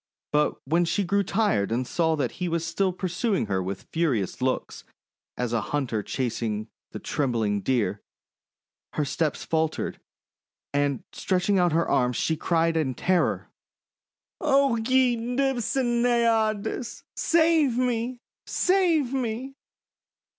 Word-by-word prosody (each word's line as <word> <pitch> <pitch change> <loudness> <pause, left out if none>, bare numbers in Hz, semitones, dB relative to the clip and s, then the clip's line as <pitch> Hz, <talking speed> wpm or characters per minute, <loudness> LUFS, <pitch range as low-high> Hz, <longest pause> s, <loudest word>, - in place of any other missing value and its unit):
But 150 0 +2
when 165 +5 +2
she 200 +4 0
grew 200 +2 +1
tired 190 - +1
and 125 +3 0
saw 160 +4 +1
that 135 -6 -1
he 180 - 0
was 165 0 -1
still 185 +3 0
pursuing 185 - -1
her 95 -2 -1
with 95 +1 -5
furious 130 - 0
looks, 130 0 -2 0.5
as 125 -1 -2
a 115 - +1
hunter 125 -4 -2
chases 110 -2 -2 0.2
the - - -7
trembling 115 -7 -1
Deer, 105 -6 0 0.9
her 150 - 0
steps 155 +2 -1
faltered, 160 -1 -1 0.7
and 145 -2 0
stretching 190 +1 +1
out 175 -1 +3
her 165 +2 +1
arms, 125 -2 +1
she 160 - +1
cried 165 +1 +1
in 135 -5 0
terror: 180 +7 0 0.4
— - - -39
!<O 275 -4 +3
ye 250 +2 +3
Nymphs 245 +1 -1
and 240 -3 +1
Naiads, 230 -1 +1
save 320 -6 +3
me! 250 0 0 0.3
Save 340 -8 +2
me!" 255 +1 -2
175 Hz, 130 wpm, -26 LUFS, -, 0.9 s, out